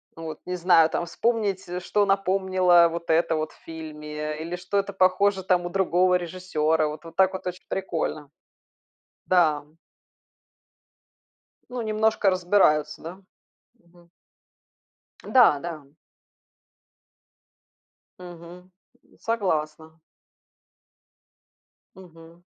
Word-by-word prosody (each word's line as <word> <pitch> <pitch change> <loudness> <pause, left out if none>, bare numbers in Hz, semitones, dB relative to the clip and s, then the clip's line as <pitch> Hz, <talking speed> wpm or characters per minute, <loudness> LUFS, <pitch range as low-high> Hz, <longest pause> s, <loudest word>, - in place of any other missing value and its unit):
мгм. 165 0 -8
Вот 155 - -7
не 180 - -3
знаю, 170 -2 +4
там 170 - -2
вспомнить, 205 0 -1
с 180 +1 -4
что 205 +2 +1
напомнило 185 -3 +3
вот 170 0 -6
это 165 0 +2
в 155 0 -2 0.2
фильме 150 -1 -7
или 170 +2 -4
что 180 +3 -3
это 200 0 -1
похоже 190 +1 +2
у 175 -1 +2
другого 180 -1 +2
режиссёра. 160 -3 -1
Вот 150 0 -7 0.2
так 190 0 +4
вот 190 - -6
очень 180 0 -7
прикольно. 160 -6 -3 1.0
Да. 160 -5 +2 2.1
Ну, 250 0 -5
немножко 215 -2 +1
разбираются, 175 -5 +2
да? 180 +4 -9 0.6
Мгм. 175 -3 -24 1.1
Да, 245 - +5
да. 160 -3 -7 2.4
Мгм, 175 -2 -11 0.6
м, - - -26
согласна. 160 -7 -3 2.0
Мгм. 170 -1 -16
175 Hz, 100 wpm, -25 LUFS, 160-190 Hz, 2.4 s, Да